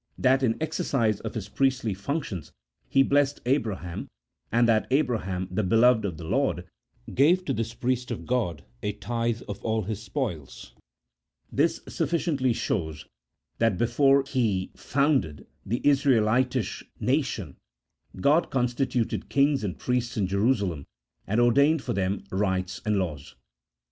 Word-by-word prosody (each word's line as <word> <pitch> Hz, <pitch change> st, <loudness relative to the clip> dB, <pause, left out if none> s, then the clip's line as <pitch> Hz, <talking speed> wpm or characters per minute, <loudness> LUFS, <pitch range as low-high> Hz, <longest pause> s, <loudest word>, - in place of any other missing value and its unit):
that 130 Hz, +1 st, +3 dB
in 115 Hz, -4 st, +1 dB
exercise 140 Hz, -, 0 dB
of -, -, -6 dB
his 110 Hz, -4 st, -4 dB
priestly 130 Hz, -5 st, 0 dB
functions 100 Hz, -, -4 dB, 0.4 s
he 135 Hz, -, +5 dB
blessed 140 Hz, +1 st, +2 dB
Abra 125 Hz, -6 st, +1 dB
ham, 85 Hz, -2 st, -6 dB, 0.4 s
and 120 Hz, +2 st, +4 dB
that 110 Hz, -2 st, +2 dB
Abraham 110 Hz, -10 st, 0 dB
the 100 Hz, +4 st, 0 dB
beloved 115 Hz, +3 st, +4 dB
of 90 Hz, -6 st, -3 dB
the 85 Hz, -, -8 dB
Lord 115 Hz, -, 0 dB, 0.5 s
gave 175 Hz, +8 st, +4 dB
to -, -, 0 dB
this 115 Hz, +1 st, -3 dB
priest 125 Hz, +1 st, -1 dB
of -, -, -5 dB
God 110 Hz, -11 st, -1 dB, 0.2 s
a 105 Hz, -, -2 dB
tithe 115 Hz, +3 st, -2 dB
of 100 Hz, -, -7 dB
all 110 Hz, -1 st, 0 dB
his 105 Hz, +2 st, -4 dB
spoils. 100 Hz, -, -5 dB, 0.8 s
This 160 Hz, +4 st, +1 dB
sufficiently 155 Hz, -5 st, 0 dB
shows 80 Hz, -9 st, -2 dB, 0.5 s
that 115 Hz, -5 st, +2 dB
before 135 Hz, +5 st, +3 dB
He 110 Hz, -9 st, 0 dB
founded 135 Hz, -, 0 dB, 0.2 s
the 120 Hz, +4 st, -2 dB
Israelitish 130 Hz, -3 st, +2 dB, 0.2 s
nation 120 Hz, -, -1 dB, 0.6 s
God 150 Hz, -, +3 dB
constituted 125 Hz, -1 st, -1 dB
kings 140 Hz, -2 st, +2 dB
and 95 Hz, -4 st, -3 dB
priests 125 Hz, -2 st, -1 dB
in 100 Hz, -, +2 dB
Jerusalem, 100 Hz, -, 0 dB, 0.4 s
and 110 Hz, +4 st, +1 dB
ordained 140 Hz, +6 st, +4 dB
for -, -, -2 dB
them 95 Hz, 0 st, -1 dB
rites 95 Hz, -1 st, -1 dB
and 105 Hz, -1 st, +2 dB
laws. 80 Hz, -7 st, -4 dB
115 Hz, 140 wpm, -26 LUFS, 100-135 Hz, 0.8 s, he